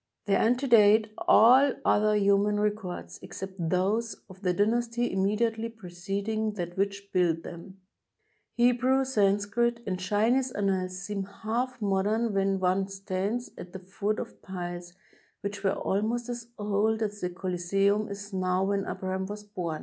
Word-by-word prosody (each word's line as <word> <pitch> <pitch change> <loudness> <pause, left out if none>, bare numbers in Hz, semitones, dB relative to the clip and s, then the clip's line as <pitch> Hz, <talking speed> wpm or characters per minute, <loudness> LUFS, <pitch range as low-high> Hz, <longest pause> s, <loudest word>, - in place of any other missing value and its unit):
They 200 - +1
antedate 220 -3 +4 0.2
all 260 +5 +7
other 210 0 +3
human 205 0 +3
records, 190 - -3
except 190 0 -7 0.2
those 205 +6 0 0.2
of 190 +1 -15
the 180 -3 +1
dynasty 235 +4 0
immediately 220 +4 0
preceding 200 +2 -3
that 175 -3 -5
which 200 0 -2
built 170 -3 +2
them. 180 +3 -10 0.8
Hebrew, 250 +2 +3
Sanskrit, 215 +1 +1
and 185 -2 -2
Chinese 225 +7 +1
annals 190 -2 -1
seem 195 -1 -3 0.2
half 245 +3 -1
mod 195 -1 +1
em 220 +1 0
when 195 0 +1
one 190 +1 +1
stands 195 +4 -3
at 175 - -9
the 190 - -6
foot 200 +3 -3
of - - -7
piles 175 -2 -6 0.5
which 200 0 -5
were 195 -1 +1
al 195 +1 0
most 235 +2 -2
as 240 -1 -5
old 210 +2 0
as 210 -1 -4
the 180 - -1
Coliseimi 195 +4 0
is 200 0 -8
now 185 0 +1
when 195 0 0
Abraham 190 0 -3
was 210 +1 -7
bom. 180 -7 -4
200 Hz, 150 wpm, -28 LUFS, 190-220 Hz, 0.8 s, all